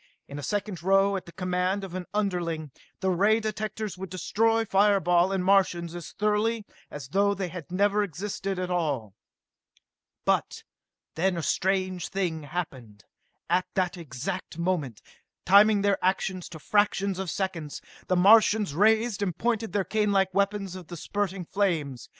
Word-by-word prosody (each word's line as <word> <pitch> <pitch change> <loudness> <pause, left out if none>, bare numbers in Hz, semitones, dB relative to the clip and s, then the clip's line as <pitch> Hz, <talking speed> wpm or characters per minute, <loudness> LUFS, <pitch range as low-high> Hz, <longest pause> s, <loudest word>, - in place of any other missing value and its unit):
In 140 - -7
a - - -5
second 205 +2 -3
now, 195 +1 +3
at 190 - -5
the - - -10
command 180 +2 -1
of 190 -3 -7
an 185 -1 -5
underling, 175 -7 -2 0.3
the 190 -1 +1
ray 205 +5 +3
directors 215 -2 -4
would 190 -1 -6
destroy 225 +5 +1
fire 200 0 +4
ball 175 +1 +3
and 190 -2 -1
Martians 185 -3 +2
as 175 -2 -8
thoroughly 210 +1 0 0.2
as 140 -3 -8
though 200 +4 +2
they 190 -3 -3
had 175 -2 -9
never 205 +2 +2
existed 195 +1 -3
at 180 0 -3
all. 140 - -1 1.1
But - - 0 0.5
then 180 +2 0
a 165 - -3
strange 185 -1 0
thing 180 -5 -2
happened. 135 -9 -6 0.4
At 180 +2 +1
that 185 -1 0
exact 165 +2 -6
moment, 170 - -2 0.4
timing 200 +2 +6
their 200 -1 +1
actions 185 -1 0
to 165 - -9
fractions 200 +2 +1
of 190 -2 -3
seconds, 165 -5 -3 0.3
the 185 - +2
Martians 210 -1 +5
raised 220 +4 +3
and 185 -5 -1
pointed 225 -1 -1
their 200 -2 0
canelike 200 -2 +1
weapons 200 -1 0
of 180 -3 -9
the 175 - -8
spurting 195 +1 -3
flames. 160 - -1
190 Hz, 155 wpm, -27 LUFS, 175-205 Hz, 1.1 s, timing